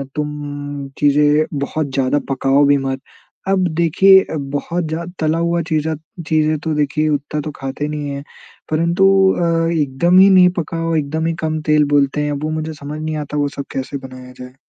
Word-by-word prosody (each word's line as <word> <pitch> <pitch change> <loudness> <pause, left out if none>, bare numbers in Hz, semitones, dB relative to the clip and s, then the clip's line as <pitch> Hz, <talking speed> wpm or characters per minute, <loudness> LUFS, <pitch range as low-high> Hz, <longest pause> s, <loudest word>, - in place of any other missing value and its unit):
तुम 145 -1 -5
चीज़ें 150 +1 +3
बहुत 145 +1 -2
ज्यादा 135 +2 +1
पकाओ 135 +1 +2
भी 145 0 +4
मत। 135 -1 -3 0.5
अब 190 -2 +2
देखिए 190 +3 +5 0.3
बहुत 170 +4 -2
ज़्या 165 +2 -4
तला 160 +1 +1
हुआ 170 0 0
चीज़ा 155 0 0 0.3
चीज़ें 155 0 +2
तो 160 0 -3
देखिए 150 +1 0
उतना 145 +1 -2
तो 155 - -5
खाते 135 +2 -4
नहीं 150 -1 -4
है। 140 0 -5 0.5
परंतु 170 +4 +2 0.3
अ, 165 -1 +1
एकदम 155 +6 +3
ही 195 - +7
नहीं 185 -2 +6
पकाओ, 165 0 -2
एकदम 155 +2 -1
ही 165 - 0
कम 155 -1 -2
तेल 150 -1 +4
बोलते 145 +1 +2
हैं, 150 - -1
वो 150 +2 -3
मुझे 155 0 -3
समझ 150 +1 -7
नहीं 155 0 -3
आता 150 +1 -5
वो 145 0 +1
सब 140 - -4
कैसे 135 +1 -4
बनाया 130 0 -12
जाए? 125 0 -10
150 Hz, 180 wpm, -18 LUFS, 145-165 Hz, 0.5 s, ही